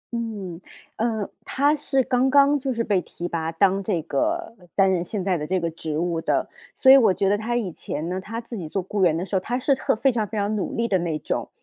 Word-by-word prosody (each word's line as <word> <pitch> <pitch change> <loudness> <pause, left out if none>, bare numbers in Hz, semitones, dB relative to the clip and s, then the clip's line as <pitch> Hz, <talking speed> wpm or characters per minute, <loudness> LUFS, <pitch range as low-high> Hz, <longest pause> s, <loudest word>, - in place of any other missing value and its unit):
嗯， 205 -7 -5 0.4
呃， 220 -2 -1 0.2
他 285 +3 +2
是 270 -3 0
刚 260 +1 +2
刚 285 +1 +5
就 265 0 -2
是 230 -1 -1
被 200 -5 +1
提 175 +1 -6
拔 165 -1 -2
当 195 +3 +2
这 185 -4 0
个 325 - -1 0.2
担 195 -1 +4
任 175 -2 +1
现 195 +1 -4
在 185 -4 0
的 150 - -4
这 185 +2 +1
个 165 -1 -2
职 160 -2 -4
务 170 0 -1
的。 - - 0 0.3
所 265 -1 +6
以 275 - +10
我 225 -7 +5
觉 195 +1 0
得 205 - +3
他 230 +3 -2
以 200 -7 -2
前 155 +1 -5
呢， 185 +1 -3
他 225 +4 -5
自 235 0 -8
己 170 -6 -5
做 195 +3 -2
雇 200 +2 -3
员 165 -2 +4
的 180 - -2
时 195 - -4
候， - - +4
他 240 +7 -2
是 275 +2 +2
特 260 - 0
非 265 +4 +2
常 220 -4 -1
非 215 - -6
常 205 +1 0
努 200 - -3
力 230 0 0
的 190 -4 +2
那 165 -3 -1
种。 - - -3
205 Hz, 280 characters per minute, -24 LUFS, 180-240 Hz, 0.4 s, 以